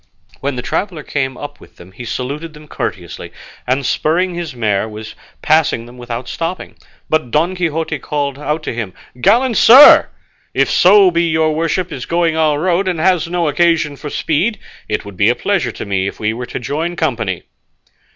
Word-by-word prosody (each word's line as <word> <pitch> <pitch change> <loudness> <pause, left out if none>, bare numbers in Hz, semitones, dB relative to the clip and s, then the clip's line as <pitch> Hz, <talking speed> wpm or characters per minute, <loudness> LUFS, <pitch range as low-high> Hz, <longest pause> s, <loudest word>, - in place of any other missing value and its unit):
When 140 0 -3
the 125 - -5
traveller 180 -7 -3
came 130 -3 -3
up 145 - -8
with - - -18
them 85 +2 -15
he 120 +6 -9
saluted 145 +7 -5
them 150 0 -14
courteously, 90 - -5 0.4
and 130 +2 0
spurring 175 +8 0
his 170 -5 -5
mare 110 -2 0
was 110 0 -9 0.3
passing 155 -7 +2
them 125 +1 -14
without 120 +1 -6
stopping, 170 +2 -5 0.3
but 155 -5 0
Don 160 +7 +1
Quixote 165 -4 -2
called 140 0 -3
out 150 +1 -2
to - - -4
him, 110 -5 -5 0.3
"Gallant 235 - +3
sir, 260 +5 +8 0.5
if - - +2
so 190 0 +6
be 170 0 +1
your 160 0 +1
worship 165 +3 -1
is 135 -4 -6
going 170 -1 +1
our 155 -2 +2
road, 185 +3 +1
and 180 -3 -1
has 175 -1 +2
no 170 -1 -1
occasion 165 -1 +1
for 150 +1 -7
speed, 175 +11 0 0.3
it 110 - -2
would 100 -3 -10
be 100 +4 +4
a 120 - +2
pleasure 200 +5 -1
to - - -7
me 100 -1 -1
if - - -6
we 110 0 -1
were 120 +1 -6
to - - -6
join 155 +7 -3
company." 115 - -2
150 Hz, 190 wpm, -16 LUFS, 125-170 Hz, 0.5 s, sir